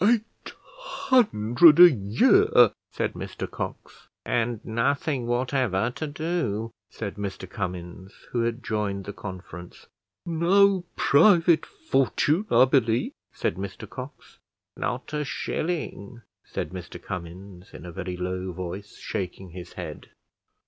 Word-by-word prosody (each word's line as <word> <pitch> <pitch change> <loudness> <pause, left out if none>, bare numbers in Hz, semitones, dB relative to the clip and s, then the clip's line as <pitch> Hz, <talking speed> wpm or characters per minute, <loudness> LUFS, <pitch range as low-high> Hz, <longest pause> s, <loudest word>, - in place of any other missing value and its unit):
"Eight 225 +1 0 0.2
hundred 170 - +4
a 175 -1 +11
year!" 260 - +4 0.2
said - - -2
Mr - - -6
Cox. - - -7 0.2
"And 120 -1 0
nothing 130 +3 0
whatever 120 -4 0
to 155 +5 -5
do!" 145 - -2 0.2
said 100 -2 -6
Mr 100 -2 -5
Cummins, 90 -1 -6 0.2
who 120 - 0
had 115 +2 -2
joined 100 -3 -2
the 100 - -6
conference. 90 -3 -9 0.4
"No 180 +3 +3
private 170 +2 +5
fortune, 200 - +1
I 120 +2 +6
believe," 125 -4 +1 0.2
said 85 - -2
Mr 100 0 -6
Cox. 130 +3 -10 0.4
"Not - - -4
a 150 0 0
shilling," 135 - -4 0.2
said - - -4
Mr 90 -1 -8
Cummins, 90 +1 -8
in - - -11
a 90 - -7
very 90 0 -5
low 90 +1 -3
voice, 95 +3 -7
shaking 95 -1 -5
his 90 0 -9
head. - - -8
115 Hz, 120 wpm, -26 LUFS, 95-155 Hz, 0.4 s, a